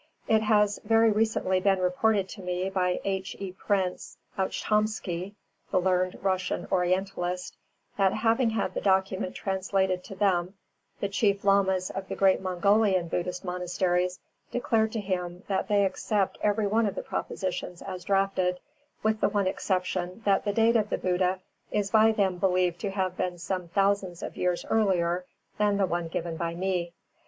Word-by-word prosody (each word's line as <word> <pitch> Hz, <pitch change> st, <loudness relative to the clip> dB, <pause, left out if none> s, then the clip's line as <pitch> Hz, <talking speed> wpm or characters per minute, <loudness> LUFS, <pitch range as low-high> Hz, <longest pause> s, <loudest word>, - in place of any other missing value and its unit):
It 220 Hz, -1 st, +4 dB
has 210 Hz, -1 st, +3 dB
very 225 Hz, +1 st, +4 dB
recently 210 Hz, -3 st, +1 dB
been 195 Hz, +1 st, +3 dB
reported 185 Hz, +2 st, +1 dB
to 195 Hz, -, -9 dB
me 180 Hz, +1 st, -2 dB
by 180 Hz, -2 st, +1 dB
H. 190 Hz, -1 st, -2 dB
E. 195 Hz, -2 st, -4 dB
Prince 190 Hz, -1 st, -2 dB, 0.2 s
Ouchtomsky, 200 Hz, -2 st, -1 dB, 0.3 s
the 185 Hz, -, +2 dB
learned 185 Hz, 0 st, +1 dB
Russian 185 Hz, -1 st, -1 dB
Orientalist, 180 Hz, 0 st, -1 dB, 0.4 s
that 195 Hz, -1 st, +4 dB
having 225 Hz, +3 st, +2 dB
had 220 Hz, -2 st, -1 dB
the -, -, -3 dB
document 190 Hz, -1 st, +1 dB
translated 190 Hz, -1 st, 0 dB
to 195 Hz, -, -8 dB
them, 185 Hz, -1 st, +1 dB, 0.5 s
the 200 Hz, -, +1 dB
Chief 200 Hz, 0 st, +1 dB
Lamas 190 Hz, -2 st, +3 dB
of 195 Hz, 0 st, -5 dB
the -, -, -4 dB
great 190 Hz, -1 st, +3 dB
Mongolian 190 Hz, 0 st, +2 dB
Buddhist 180 Hz, +2 st, -3 dB
monasteries 180 Hz, 0 st, 0 dB, 0.3 s
declared 225 Hz, -2 st, +1 dB
to 225 Hz, -, -1 dB
him 180 Hz, -2 st, -3 dB
that 195 Hz, -1 st, -1 dB
they 205 Hz, -1 st, +3 dB
accept 195 Hz, +1 st, -1 dB
every 210 Hz, +1 st, +1 dB
one 220 Hz, +2 st, +2 dB
of 200 Hz, -, -3 dB
the -, -, -4 dB
propositions 180 Hz, -1 st, -4 dB
as 185 Hz, -2 st, -6 dB
drafted, 195 Hz, -2 st, +1 dB, 0.4 s
with 220 Hz, 0 st, +1 dB
the -, -, +3 dB
one 205 Hz, -1 st, 0 dB
exception 185 Hz, 0 st, -2 dB
that 200 Hz, 0 st, +3 dB
the 205 Hz, -, +1 dB
date 225 Hz, +2 st, +3 dB
of 210 Hz, -2 st, 0 dB
the -, -, 0 dB
Buddha 185 Hz, 0 st, 0 dB, 0.3 s
is 205 Hz, -1 st, -1 dB
by 220 Hz, 0 st, +6 dB
them 195 Hz, -4 st, 0 dB
believed 180 Hz, -2 st, +1 dB
to 200 Hz, -, -2 dB
have 190 Hz, -2 st, -2 dB
been 180 Hz, -1 st, -2 dB
some 180 Hz, +1 st, -3 dB
thousands 195 Hz, -1 st, 0 dB
of -, -, -6 dB
years 180 Hz, -1 st, -1 dB
earlier 180 Hz, -5 st, +2 dB, 0.3 s
than 205 Hz, -1 st, +3 dB
the 200 Hz, -, +3 dB
one 175 Hz, -2 st, -2 dB
given 165 Hz, 0 st, -4 dB
by 170 Hz, 0 st, -2 dB
me. 180 Hz, -1 st, -1 dB
190 Hz, 165 wpm, -27 LUFS, 180-205 Hz, 0.5 s, by